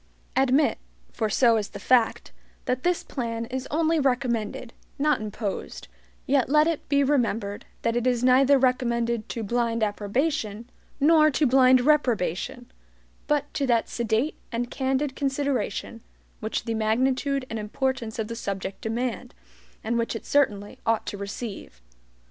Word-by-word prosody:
Admit, 270 +3 +3 0.3
for 220 -2 -1
so 230 +2 +4
is 210 -2 -2
the - - -9
fact, 245 -3 +2 0.3
that 255 0 -1
this 355 +2 0
plan 230 -3 -4
is 255 +2 -5
only 325 +1 +2
RECOMMENDED, 250 -3 -1 0.2
not 300 -3 +2
imposed, 210 -1 -5 0.4
yet 265 -2 +2
let 300 +2 +5
it 325 -4 -2
be 280 0 +3
remembered 230 -7 0 0.2
that 230 0 +1
it 240 +1 0
is 245 -1 +1
neither 265 +2 +5
recommended 235 -3 0
to 230 - -4
BLIND 230 +1 0
approbation, 215 +2 -1 0.3
nor 310 +1 +5
to 300 +1 +1
BLIND 255 -1 +5
reprobation; 245 - 0 0.6
but 295 -1 0
to 275 - -1
that 235 -2 +2
sedate 235 +5 -1
and 240 0 -3
candid 265 +1 -1
consideration 275 -4 -2 0.4
which 220 - -3
the 230 - -1
magnitude 255 +5 0
and 225 -2 -4
importance 230 +1 -2
of 220 -2 -2
the 230 - -5
subject 195 -3 -5
demand, 225 - -3 0.5
and 235 +2 0
which 230 0 -1
it 225 - -6
certainly 210 -8 0
ought 225 -1 +1
to - - -4
receive. 200 - -7
245 Hz, 145 wpm, -25 LUFS, 225-270 Hz, 0.6 s, let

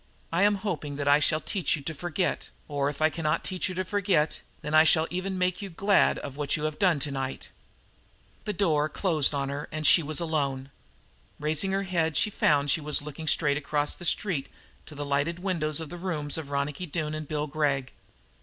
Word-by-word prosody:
I 170 - +2
am 205 +1 +5
hoping 175 -8 -4
that 145 0 -3
I 145 +1 +6
shall 155 +1 +2
teach 180 +3 0
you 145 - -8
to 160 - -3
forget; 175 +1 -2 0.2
or, 145 -1 0
if 145 +1 -4
I 155 - +4
cannot 155 -2 -1
teach 185 -1 -1
you 185 - -5
to 185 +1 -2
forget, 190 -6 +1 0.2
than 150 - -5
I 155 0 +8
shall 160 0 +4
even 185 +2 -2
make 185 +1 0
you 200 - -5
glad 195 +3 +3
of 140 -2 -7
what 145 0 0
you 150 - -5
have 155 0 -2
done 185 -6 +4
tonight." 135 -2 -3 1.0
The 210 - -1
door 155 -6 +1
closed 155 -5 +2
on 140 -1 -1
her, 140 +1 -5
and 155 0 -4
she 170 - +7
was 155 +1 -1
alone. 140 -5 -1 0.7
Raising 155 +6 +1
her 195 0 0
head 165 -4 0
she 210 - +1
found 145 -6 +2
she 160 - +1
was 150 -1 +1
looking 150 +2 -7
straight 145 -3 +3
across 150 0 -1
the - - -10
street 170 -4 0 0.4
to 150 - -10
the 145 0 -4
lighted 145 +4 0
windows 165 -5 -1
of 160 -2 -6
the 175 - -7
rooms 160 -5 -2
of 160 -3 -4
Ronicky 140 +5 -2
Doone 155 -1 -3
and 155 -1 -5
Bill 150 0 -2
Gregg. 140 -3 -1
155 Hz, 210 wpm, -27 LUFS, 145-175 Hz, 1.0 s, I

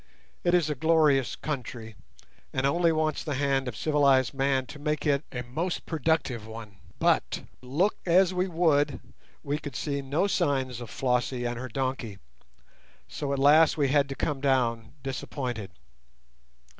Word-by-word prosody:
It 175 0 +3
is 170 -4 +3
a 150 - 0
glorious 150 -2 +3
country, 120 -6 -5 0.6
and 130 0 -1
only 170 +4 +3
wants 155 -1 0
the 150 -4 -3
hand 135 -1 +1
of 115 -4 -5
civilized 140 -4 +3
man 135 -1 +1
to 145 +3 -11
make 150 +2 -2
it 140 -1 +2
a 125 -1 -4
most 160 +9 -3
productive 155 -8 -1
one. 110 -3 -10 0.2
But - - +1 0.2
look 150 +11 0
as 185 +1 +4
we 180 +1 0
would, 160 -5 +2 0.4
we 145 +2 -2
could 145 -5 -8
see 140 -2 -2
no 140 +7 0
signs 130 - 0
of 120 - -7
Flossie 125 0 -1
and 120 0 -2
her 130 0 -5
donkey, 130 -4 -3 0.9
so 140 -2 -4
at 140 - 0
last 150 +4 +5
we 140 -3 +2
had 140 0 +3
to 135 - -4
come 140 -2 -2
down 120 -4 +1
disappointed. 125 -5 -4
140 Hz, 155 wpm, -27 LUFS, 125-155 Hz, 0.9 s, last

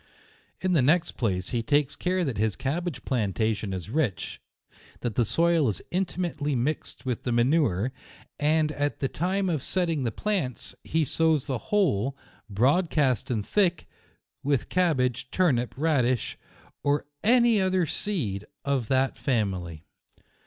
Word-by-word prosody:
In 185 -1 +1
the 160 - +4
next 165 +6 +3
place 95 -6 -1
he 120 - 0
takes 145 +2 +1
care 185 0 0
that 125 -8 -3
his 110 -3 +1
cabbage 150 - -3
plantation 110 -3 0
is 95 +2 -5
rich, 125 - -1 0.6
that 120 -3 -2
the 120 - +2
soil 165 +1 +3
is 105 - -4
intimately 175 -5 -1
mixed 135 +3 -2
with 125 -3 -2
the 125 - -2
ma 120 0 +4
nure, 125 - +2 0.5
and 155 +1 +2
at 145 -1 -2
the 135 - +1
time 190 +7 -1
of 160 -6 0
setting 165 -2 0
the 115 - 0
plants, 170 - -2
he 160 -1 +1
sows 160 0 +2
the 130 -4 -2
whole, 140 - +1 0.3
broadcast 135 - +2
and 110 -5 -1
thick, 185 -5 +1 0.5
with 140 -2 0
cabbage, 130 -8 +1
turnip, 130 -10 +1
radish, 130 -6 +1 0.5
or 145 0 +1 0.2
any 235 -2 +5
other 185 -2 +2
seed 130 - -2 0.2
of 135 -5 0
that 130 +1 +1
family. 95 - -1
140 Hz, 145 wpm, -27 LUFS, 120-170 Hz, 0.6 s, any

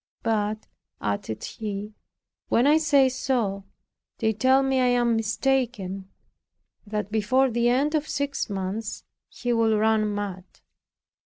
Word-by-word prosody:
But," 215 -1 -1 0.3
added 105 +1 -3
he, 210 -1 -5 0.6
"when 240 - +3
I 295 +2 +6
say 290 -4 +4
so, 235 -7 -1 0.5
they 220 -2 +1
tell 260 +5 +3
me 270 -1 +1
I 250 - +3
am 240 -1 +2
mistaken, 220 -4 -1 0.8
and 205 - -17
that 210 -1 -2
before 255 +5 +2
the 235 +1 +2
end 275 +5 +2
of 305 -1 -1
six 285 -3 -2
months 200 +3 -4 0.3
he 245 -1 -2
will 225 -2 +3
run 215 0 +2
mad." 200 -3 -4
225 Hz, 135 wpm, -25 LUFS, 205-260 Hz, 0.8 s, I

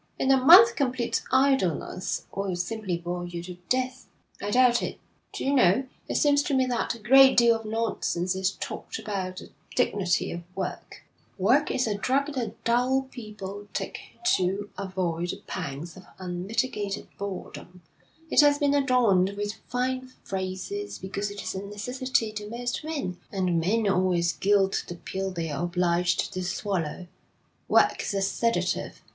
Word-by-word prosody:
'In 265 - +2
a 270 - +6
month 385 - +9
complete 255 -4 0
idleness 260 - +1
will 195 -2 -1
simply 185 0 -2
bore 175 +1 -4
you 170 -1 -6
to 180 0 -8
death.' 255 0 -1 0.3
'I 205 - -3
doubt 245 +1 +4
it. - - -4 0.3
Do - - -5
you 275 - +2
know, 250 0 +4 0.2
it - - -2
seems 285 -1 +4
to 285 - -1
me 260 -1 +3
that 245 -1 -1
a - - -12
great 265 +4 +7
deal 235 -1 +6
of 225 0 -6
nonsense 215 -5 -1
is 190 +1 0
talked - - -6
about 185 -3 -4
the - - -9 0.2
dignity 190 -3 +1
of 170 - -5
work. 190 -2 -5 0.3
Work 245 +10 +3
is 255 - +1
a 215 - 0
drug 280 +6 +1
that 230 -5 -4
dull 250 +3 +2
people 205 -3 -8
take - - -3 0.4
to 195 +3 -2
avoid 180 -3 -2
the - - -5
pangs 145 +5 -5
of 185 -1 -13
unmitigated 195 +3 -3
boredom. 185 -2 -7 0.5
It - - +7
has 290 -1 +5
been 285 -1 +2
adorned 235 -9 +3
with 205 0 -2
fine 255 +1 -1 0.2
phrases, 190 - -4
because 200 +2 -4
it 205 0 -7
is - - -3
a 190 - -4
necessity 225 +3 -2
to 210 -1 -6
most 245 +4 -3
men, 285 - -3
and 185 -4 +1
men 210 +6 +1
always 180 -3 +2
gild 195 -1 +2
the 175 - -6
pill 190 +2 -4
they're 165 -5 -4
obliged 175 0 +1
to 185 - -3
swallow. 180 -3 -2 0.6
Work - - +4
is 200 - -3
a 195 - +1
sedative. 230 +4 -1
205 Hz, 160 wpm, -27 LUFS, 185-255 Hz, 0.6 s, month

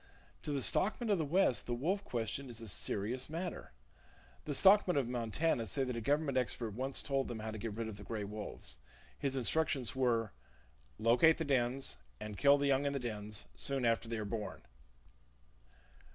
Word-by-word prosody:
To 150 - -4
the 140 -3 0
stockmen 220 +2 +3
of 195 - +3
the 160 - 0
west 160 -4 +2
the 120 - -1
wolf 185 +11 -1
question 125 - -3
is 120 -1 -5
a 115 - -7
serious 110 +7 -1
matter. 170 - -5 0.7
The 145 - -2
stockmen 190 -1 +6
of 135 -4 +1
Montana 120 +2 -1
say 135 - 0
that 125 -2 -3
a 115 - -3
government 140 +2 +1
expert 115 -1 -2
once 130 +6 -1
told 135 -1 0
them 120 - -5
how 110 0 -5
to 110 - -6
get 110 -1 -4
rid 115 0 -3
of 110 -2 -7
the 100 - -10
gray 110 -1 -4
wolves. 100 - -6 0.4
His 135 -1 0
instructions 135 -1 +1
were: 120 -4 +1 0.7
"Locate 125 +8 +5
the 160 - -2
dens, 130 - +1 0.2
and 105 -1 -6
kill 140 +7 +5
the 140 - 0
young 140 0 +2
in 140 - -1
the 140 - -1
dens, 105 - -3
soon 125 - -1
after 115 0 +1
they 115 - -2
are 110 - -3
born!" 105 0 -5
125 Hz, 190 wpm, -34 LUFS, 110-140 Hz, 0.7 s, stockmen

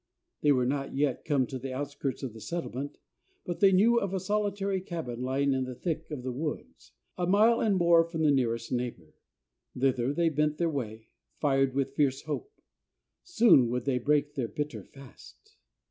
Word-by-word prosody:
They 150 - +4
were 130 -3 +3
not 135 +1 -2
yet 140 -2 0
come 140 -4 +2
to 130 +1 -6
the 130 +1 -5
outskirts 140 0 -4
of 125 -5 -4
the 110 - -11
settlement, 145 -4 -5 0.5
but 175 - -4
they 195 -2 +6
knew 225 +6 +5
of 195 -2 -3
a - - 0
solitary 200 -1 -1
cabin 160 -10 -5
lying 135 +2 +1
in 130 -1 0
the 130 -1 -7
thick 160 +2 -4
of 145 -5 -6
the 130 - -3
woods 150 +4 -6 0.3
a 175 - 0
mile 215 +5 +4
and 210 -3 +2
more 170 -2 +5
from 165 -1 -3
the 150 - +5
nearest 115 -4 0
neighbor. 120 -10 -4 0.6
Thither 125 -1 +1
they 170 +2 +2
bent 150 0 0
their 170 -1 0
way, 115 -5 -5 0.3
fired 135 -2 +2
with 135 -1 -1
fierce 140 -2 +1
hope. 155 - -5 0.7
Soon 230 - +5
would 125 0 -2
they 130 -3 +1
break 145 +3 +1
their 130 -5 -2
bitter 150 +5 -5
fast. 140 - -16
145 Hz, 185 wpm, -29 LUFS, 130-170 Hz, 0.7 s, they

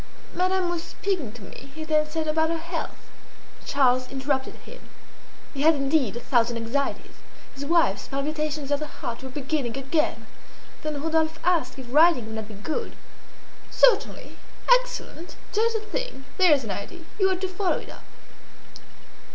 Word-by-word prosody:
"Madame 370 0 +1
was 345 -1 -1
speaking 345 - -2
to 230 -2 -12
me," 270 +7 -11
he 315 - -5
then 305 -1 +2
said, 315 0 -2
"about 320 +1 +2
her 330 - 0
health." 335 +1 -6 0.6
Charles 255 -2 +3
interrupted 265 0 -1
him; - - -13 0.7
he 275 - -3
had 320 +2 +6
indeed 275 -5 +1
a - - -3
thousand 235 -2 +2
anxieties; 235 +5 -2 0.4
his 275 +1 -6
wife's 325 - +2
palpitations 295 +1 -2
of 285 - +2
the 305 - -4
heart 235 -4 -6
were 265 - -7
beginning 270 -2 -2
again. 285 +4 0 0.6
Then 305 -1 -3
Rodolphe 320 0 +1
asked 345 -5 +1
if 265 - -7
riding 315 -5 +6
would 220 0 -6
not 220 -1 -5
be 215 - -10
good. 310 - -4 0.7
"Certainly! - - +3 0.3
excellent! - - -2 0.2
just 455 +2 +2
the 445 - 0
thing! 470 - -4
There's 305 -8 +5
an 215 - -4
idea! 200 - -6 0.2
You 385 -1 +4
ought 375 -1 -1
to 380 - 0
follow 370 0 0
it - - -8
up." - - -13
305 Hz, 160 wpm, -26 LUFS, 265-340 Hz, 0.7 s, had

